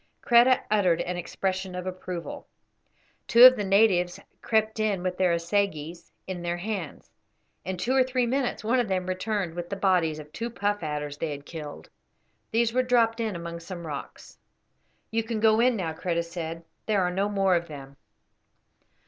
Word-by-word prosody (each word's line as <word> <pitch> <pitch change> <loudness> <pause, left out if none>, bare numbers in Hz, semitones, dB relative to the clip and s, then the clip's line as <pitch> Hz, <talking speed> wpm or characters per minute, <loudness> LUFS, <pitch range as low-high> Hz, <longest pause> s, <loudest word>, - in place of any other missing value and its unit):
Kreta 240 +2 +5
uttered 185 -6 +3
an 180 - -3
expression 185 +1 -3
of 180 0 -5
approval. 185 -2 -6 0.8
Two 235 +1 +7
of 255 0 +11
the 205 - -2
natives 195 -3 +3 0.2
crept 220 0 0
in 205 -4 0
with 185 -1 -1
their 185 -1 +2
assegais 170 -2 -2
in 185 -2 -5
their 175 0 -2
hands. 190 -4 -5 0.5
In 185 0 -4
two 235 +9 -1
or 265 - +5
three 255 -1 0
minutes 255 -2 -1
one 235 +4 +2
of 240 - 0
them 185 -2 -1
returned 185 -1 -2
with 175 0 -6
the 200 - -3
bodies 180 -5 +2
of 150 0 -11
two 230 +1 -4
puff 205 -2 -1
adders 150 -2 -4
they 165 - -2
had 145 -1 -7
killed. 150 -3 -8 0.6
These 230 0 +1
were 255 - +3
dropped 235 -2 +2
in 220 -4 -2
among 170 0 -6
some 170 0 -8
rocks. 145 -3 -8 0.7
"You 225 +1 +1
can 225 -1 -3
go 220 0 +4
in 245 +1 +4
now," 170 -6 -3
Kreta 170 +1 -1
said. 165 -1 -6 0.2
"There 205 -3 +2
are 180 - 0
no 195 +3 0
more 195 -2 +2
of 170 0 -1
them." 140 -3 -10
185 Hz, 180 wpm, -26 LUFS, 170-220 Hz, 0.8 s, of